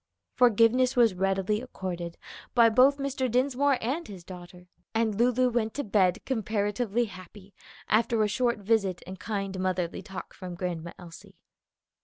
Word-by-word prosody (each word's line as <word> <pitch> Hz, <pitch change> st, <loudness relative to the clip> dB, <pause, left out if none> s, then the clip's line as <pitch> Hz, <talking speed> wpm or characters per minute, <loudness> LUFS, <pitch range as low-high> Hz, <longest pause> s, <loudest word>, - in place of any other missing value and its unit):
Forgiveness 245 Hz, +2 st, +4 dB
was 235 Hz, -5 st, +5 dB
readily 195 Hz, +3 st, 0 dB
accorded 180 Hz, -8 st, -6 dB, 0.4 s
by 235 Hz, -2 st, +7 dB
both 255 Hz, +5 st, +5 dB
Mr. 275 Hz, -2 st, -2 dB
Dinsmore 265 Hz, +3 st, +2 dB
and 280 Hz, +9 st, -2 dB
his 190 Hz, -4 st, -10 dB
daughter, 180 Hz, 0 st, -11 dB, 0.3 s
and 225 Hz, -1 st, +1 dB
Lulu 245 Hz, +3 st, +2 dB
went 225 Hz, -2 st, -1 dB
to 285 Hz, -, -2 dB
bed 190 Hz, -4 st, +1 dB
comparatively 220 Hz, -1 st, -1 dB
happy 190 Hz, 0 st, -13 dB, 0.3 s
after 225 Hz, 0 st, +2 dB
a -, -, +2 dB
short 235 Hz, +3 st, 0 dB
visit 200 Hz, -3 st, 0 dB
and 185 Hz, 0 st, -9 dB
kind 195 Hz, -2 st, -4 dB
motherly 185 Hz, -2 st, -2 dB
talk 190 Hz, -1 st, -9 dB
from 180 Hz, -2 st, -8 dB
Grandma 170 Hz, -2 st, -4 dB
Elsie. 170 Hz, -2 st, -13 dB
210 Hz, 145 wpm, -28 LUFS, 185-245 Hz, 0.4 s, by